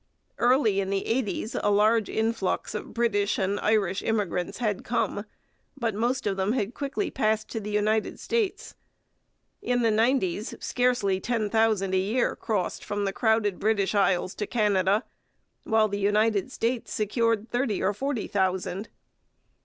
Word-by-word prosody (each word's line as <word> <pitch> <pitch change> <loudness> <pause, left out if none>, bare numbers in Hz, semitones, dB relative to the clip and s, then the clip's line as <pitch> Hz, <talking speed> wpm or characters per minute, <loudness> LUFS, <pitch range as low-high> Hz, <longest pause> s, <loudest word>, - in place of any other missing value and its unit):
Early 240 -5 +3
in 195 -1 -1
the 195 0 -1
eighties 225 -2 -1
a 205 - +2
large 215 +1 +3
influx 220 -3 -1
of 210 - -5
British 205 -4 +1
and 195 0 0
Irish 200 -3 +1
immigrants 200 -3 -1
had 215 -5 -1
come, - - -1 0.5
but 230 -4 -1
most 240 +5 -1
of 195 -2 0
them 195 +3 +1
had 230 -3 -1
quickly 280 +8 -3
passed 220 0 0
to 225 - -3
the 210 -1 -6
United 210 +1 0
States. 450 -5 -2 0.9
In 245 -1 0
the 225 - +3
nineties 220 -3 +1
scarcely 245 -7 +1
ten 220 -2 -1
thousand 220 -4 +2
a 190 - +3
year 220 +6 0
crossed 205 -6 -2
from 205 0 -2
the 195 - -1
crowded 220 -3 +1
British 205 -2 +1
Isles 195 -2 +2
to 210 - -2
Canada, 205 -2 +2 0.6
while 220 -1 +3
the 200 -1 -3
United 205 0 +2
States 235 +1 -2
secured 225 +1 0
thirty 245 -5 0
or 195 +2 +2
forty 265 +1 -2
thousand. 190 +1 -1
215 Hz, 155 wpm, -26 LUFS, 200-230 Hz, 0.9 s, Early